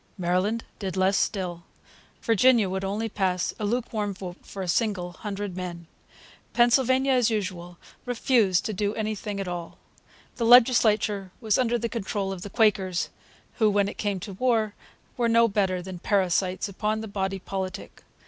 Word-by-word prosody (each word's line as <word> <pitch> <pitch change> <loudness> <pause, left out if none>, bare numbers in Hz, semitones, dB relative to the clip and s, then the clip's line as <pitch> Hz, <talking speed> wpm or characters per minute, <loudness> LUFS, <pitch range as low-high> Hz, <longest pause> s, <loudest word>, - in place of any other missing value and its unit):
Maryland 185 +5 0 0.2
did 190 -2 -4
less 190 +1 +3
still. 180 -5 -1 0.6
Virginia 230 -1 +4
would 190 +1 -3
only 205 +4 -2
pass 185 -4 -1
a 210 - -2
lukewarm 215 -3 -2
vote 180 -1 -8
for 195 - -7
a - - -5
single 180 -2 0
hundred 200 0 -5
men. 175 -2 -6 0.7
Pennsylvania, 260 +2 +3
as 250 -3 +3
usual, 180 -5 -4 0.3
refused 225 -6 +2
to 215 - -2
do 205 +2 -1
anything 215 -2 -3
at 195 - -3
all. 175 -1 -6 0.6
The 235 - 0
legislature 220 -5 +5
was 220 -2 +1
under 240 -1 +2
the 235 0 -2
control 200 -3 -3
of 185 - -8
the 205 - -6
Quakers, 195 -5 +1 0.5
who, 215 -2 +5
when 200 -1 +2
it - - -7
came 205 -3 -1
to 200 0 -7
war, 220 -1 +1 0.4
were 235 -2 +2
no 230 0 +5
better 190 -4 0
than 185 -1 -7
parasites. 185 0 +1
upon 210 +2 -2
the 220 - -6
body 195 -1 -2
politic. 190 0 -6
205 Hz, 160 wpm, -26 LUFS, 185-225 Hz, 0.7 s, legislature